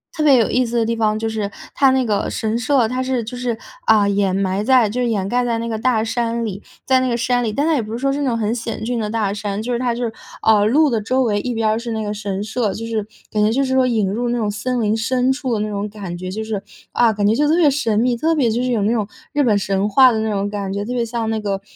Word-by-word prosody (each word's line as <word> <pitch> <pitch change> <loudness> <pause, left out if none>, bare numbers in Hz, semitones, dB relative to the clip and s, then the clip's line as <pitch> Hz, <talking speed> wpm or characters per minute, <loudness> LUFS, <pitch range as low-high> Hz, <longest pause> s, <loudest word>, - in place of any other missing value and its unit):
特 310 - -1
别 285 -3 +6
有 225 - +2
意 255 +1 +2
思 235 0 -2
的 230 - +3
地 230 +1 -1
方 215 -1 +1
就 225 0 -2
是 215 -2 -3 0.2
它 270 -2 +5
那 260 0 +2
个 210 -4 0
神 220 +1 -2
社， 240 0 +2
它 255 +3 -2
是 255 -2 -1
就 230 +3 -7
是， 245 -2 -2 0.3
啊， 210 - +4
掩 200 -2 +1
埋 195 +1 0
在 250 -2 +4
就 235 +5 -3
是 245 - +1
掩 200 -4 -1
盖 245 +2 +1
在 230 -1 0
那 230 0 -3
个 220 - -2
大 225 -1 +1
山 230 0 -1
里， 210 -2 -5 0.2
在 260 -1 +4
那 255 - 0
个 240 - 0
山 245 +1 +1
里。 220 -2 -2
但 285 +7 0
它 325 - +3
也 265 - +1
不 215 - -8
是 235 - -3
说 275 +1 +1
是 285 +1 -1
那 - - 0
种 240 - +1
很 225 0 -1
险 225 -2 -5
峻 240 +1 -1
的 210 -1 -2
大 220 -3 0
山， 205 0 -3
就 240 +3 -4
是 240 - +1
它 245 -1 0
就 240 +1 -3
是， 230 - -3 0.3
啊， 215 -2 +4
路 295 +7 +4
的 230 -4 0
周 255 +5 0
围 215 -5 +1
一 245 - -3
边 225 -1 +1
儿 215 - +1
是 235 0 -5
那 220 -1 -2
个 205 - -3
神 200 -1 -3
社， 220 -1 -1
就 225 +1 -6
是 220 -2 -2 0.2
感 210 -1 0
觉 215 - +2
就 270 +4 +1
是 260 -1 -1
说 260 -1 +4
引 220 -6 +1
入 240 +5 -1
那 240 - 0
种 215 -2 0
森 240 +4 -2
林 215 0 +1
深 250 +3 +1
处 265 -2 -2
的 220 - 0
那 215 0 -2
种 205 0 -3
感 200 -4 -7
觉， 185 +1 -6
就 220 +3 -4
是， 215 -3 -4 0.3
啊， 235 -2 +3
感 205 -1 +1
觉 215 - +3
就 295 +4 +2
特 310 - +3
别 335 -4 +5
神 230 -7 0
秘， 240 +1 +1
特 320 +7 +1
别 275 -7 +2
就 235 +3 0
是 255 - 0
有 230 -4 +1
那 205 +3 +1
种 220 -4 0 0.3
日 290 -1 +2
本 225 -5 +3
神 195 0 0
话 255 +4 +6
的 225 - -1
那 220 0 -1
种 200 0 -1
感 200 -2 -4
觉， 200 +1 -2
特 240 +4 -4
别 240 -2 0
像 230 -1 -3
那 220 0 -1
个， 200 -2 -2
225 Hz, 335 characters per minute, -19 LUFS, 210-250 Hz, 0.3 s, 别